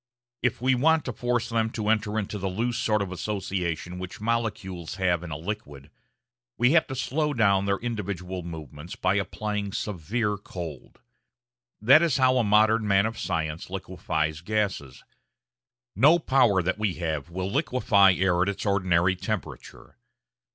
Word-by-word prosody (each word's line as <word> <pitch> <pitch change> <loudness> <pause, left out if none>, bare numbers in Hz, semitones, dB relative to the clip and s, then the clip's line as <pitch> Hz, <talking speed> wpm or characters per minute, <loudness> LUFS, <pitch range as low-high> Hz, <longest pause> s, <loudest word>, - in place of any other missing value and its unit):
If 125 - 0
we 130 +2 +2
want 155 +5 +3
to 125 - -3
force 120 0 -1
them 115 -1 +1
to 110 -2 -3
enter 110 -1 +1
into 105 -1 -3
the 95 0 -2
loose 120 +5 -2
sort 105 -2 +1
of 95 - -6
association 90 -3 -3
which 90 0 -7
molecules 105 -7 -3
have 90 -3 +1
in 90 - -7
a 75 - -4
liquid, 75 -6 -7 0.7
we 120 +2 +4
have 160 0 +4
to 130 - -5
slow 145 +3 -1
down 100 -4 +3
their 100 0 +1
individual 95 -6 -4
movements 80 0 -8
by 95 0 +1
applying 105 0 -2
severe 105 +2 -2
cold. 85 -8 -9 0.8
That 135 +8 +6
is 165 -6 +2
how 130 -1 +4
a - - +3
modern 110 +1 +3
man 100 0 +4
of 110 0 -4
science 80 -2 -3
liquefies 80 -5 -3
gases. 95 -10 -2 0.9
No 145 - +6
power 125 - +3
that 90 +4 -1
we 105 -5 0
have 80 -3 -3
will 95 +2 -4
liquefy 100 -5 +3
air 90 -1 +2
at 95 - +2
its 100 - -4
ordinary 90 -3 +2
temperature. 105 +1 -6
100 Hz, 160 wpm, -26 LUFS, 90-115 Hz, 0.9 s, That